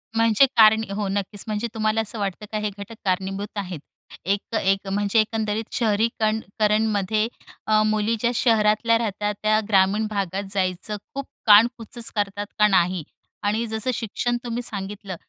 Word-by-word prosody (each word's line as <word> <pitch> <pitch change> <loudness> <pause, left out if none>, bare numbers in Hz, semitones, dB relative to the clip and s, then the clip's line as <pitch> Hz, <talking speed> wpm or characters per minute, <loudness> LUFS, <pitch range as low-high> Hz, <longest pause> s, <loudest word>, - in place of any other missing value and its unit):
म्हणजे 225 +2 +5
कारण 220 0 +7
हो, 200 0 -2
नक्कीच. 200 +1 -3
म्हणजे 215 +2 -2
तुम्हाला 215 0 +1
असं 220 +1 -4
वाटतं 200 +1 -3
का 215 - -2
हे 210 0 -1
घटक 200 +3 -8
कारणीभूत 195 +2 -2
आहेत? 185 -5 -4 0.5
एक 200 +2 +1
त - - 0
एक 195 -1 +1
म्हणजे 205 +2 +1
एकंदरीत 220 0 -1
शहरीकण 220 -1 +1 0.2
करणमध्ये 215 0 +2 0.4
अ, 215 0 +4
मुली 215 +1 +1
ज्या 235 +2 +1
शहरातल्या 225 0 +3
राहतात, 210 -2 -2
त्या 215 0 +3
ग्रामीण 200 +2 +3
भागात 195 -2 -2
जायचं 190 +2 -1 0.2
खूप 275 0 -3 0.2
कानकुच 230 +2 +4
करतात 205 0 -1
का 210 - +6
नाही. 180 -3 +2 0.4
आणि 215 +3 +1
जसं 220 +3 -2
शिक्षण 240 +2 -2
तुम्ही 240 0 -3
सांगितलं, 200 -2 -4
210 Hz, 155 wpm, -23 LUFS, 200-220 Hz, 0.5 s, कारण